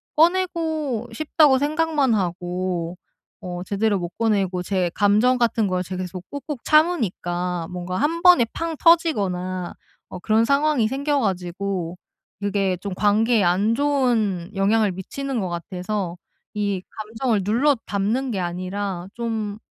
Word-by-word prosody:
꺼내고 320 Hz, -7 st, +1 dB
싶다고 295 Hz, 0 st, +4 dB
생각만 295 Hz, -3 st, +1 dB
하고 180 Hz, -2 st, -2 dB, 0.4 s
어 180 Hz, -1 st, -6 dB
제대로 200 Hz, 0 st, 0 dB
못 175 Hz, -1 st, -4 dB
꺼내고 195 Hz, -5 st, 0 dB
제 185 Hz, -2 st, 0 dB
감정 215 Hz, +5 st, +3 dB
같은 230 Hz, -3 st, +1 dB
걸 185 Hz, -1 st, -1 dB
제가 185 Hz, +1 st, -5 dB
계속 180 Hz, 0 st, -8 dB
꾹꾹 285 Hz, 0 st, -5 dB
참으니까 180 Hz, -, +1 dB
뭔가 180 Hz, 0 st, -4 dB
1 335 Hz, -, 0 dB
번에 355 Hz, -10 st, +7 dB
팡 330 Hz, -1 st, -3 dB
터지거나 185 Hz, -, +2 dB, 0.4 s
어 185 Hz, -, -7 dB
그런 220 Hz, +4 st, +2 dB
상황이 280 Hz, -3 st, +2 dB
생겨 280 Hz, +3 st, 0 dB
가지고 185 Hz, -3 st, -2 dB, 0.4 s
그게 195 Hz, -2 st, 0 dB
좀 195 Hz, +1 st, -5 dB
관계에 215 Hz, +1 st, +3 dB
안 195 Hz, +6 st, +2 dB
좋은 235 Hz, -11 st, +1 dB
영향을 205 Hz, +1 st, +2 dB
미치는 255 Hz, +8 st, -4 dB
것 185 Hz, -3 st, -2 dB
같아서 180 Hz, +1 st, -4 dB, 0.4 s
이 200 Hz, -3 st, -1 dB
감정을 220 Hz, -1 st, -2 dB
눌러 255 Hz, +8 st, +3 dB
담는 220 Hz, +6 st, -1 dB
게 195 Hz, -, -2 dB
아니라 185 Hz, +1 st, -3 dB
좀 220 Hz, -3 st, -3 dB
205 Hz, 265 characters per minute, -23 LUFS, 185-265 Hz, 0.4 s, 번에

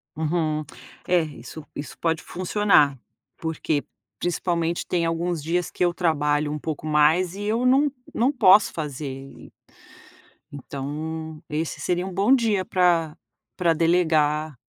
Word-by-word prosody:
Uhum. 155 Hz, -1 st, -1 dB, 0.4 s
É, 180 Hz, 0 st, +4 dB
isso 150 Hz, 0 st, -8 dB
isso 145 Hz, -, -7 dB
pode 165 Hz, -1 st, 0 dB
funcionar, 180 Hz, -6 st, +2 dB, 0.4 s
porque 160 Hz, -2 st, -2 dB, 0.4 s
principalmente 170 Hz, -1 st, -1 dB
tem 170 Hz, -2 st, 0 dB
alguns 165 Hz, -1 st, -1 dB
dias 175 Hz, +2 st, -1 dB
que -, -, -2 dB
eu 175 Hz, -, +1 dB
trabalho 150 Hz, -4 st, +1 dB
um 150 Hz, -, -2 dB
pouco 155 Hz, 0 st, -5 dB
mais 160 Hz, +4 st, +3 dB
e 205 Hz, -, -6 dB
eu 225 Hz, +4 st, 0 dB
não 275 Hz, +3 st, +4 dB, 0.2 s
não 250 Hz, +5 st, +2 dB
posso 210 Hz, -5 st, +5 dB
fazer 150 Hz, -2 st, -5 dB
e 135 Hz, +1 st, -10 dB, 1.0 s
então 150 Hz, +3 st, -6 dB
esse 155 Hz, +2 st, -3 dB
seria 180 Hz, +1 st, -1 dB
um 190 Hz, -, -6 dB
bom 200 Hz, +8 st, +3 dB
dia 220 Hz, -7 st, +2 dB
para 170 Hz, -4 st, +2 dB, 0.4 s
para 170 Hz, -2 st, +3 dB
delegar. 155 Hz, -3 st, +1 dB
165 Hz, 135 wpm, -24 LUFS, 150-180 Hz, 1.0 s, posso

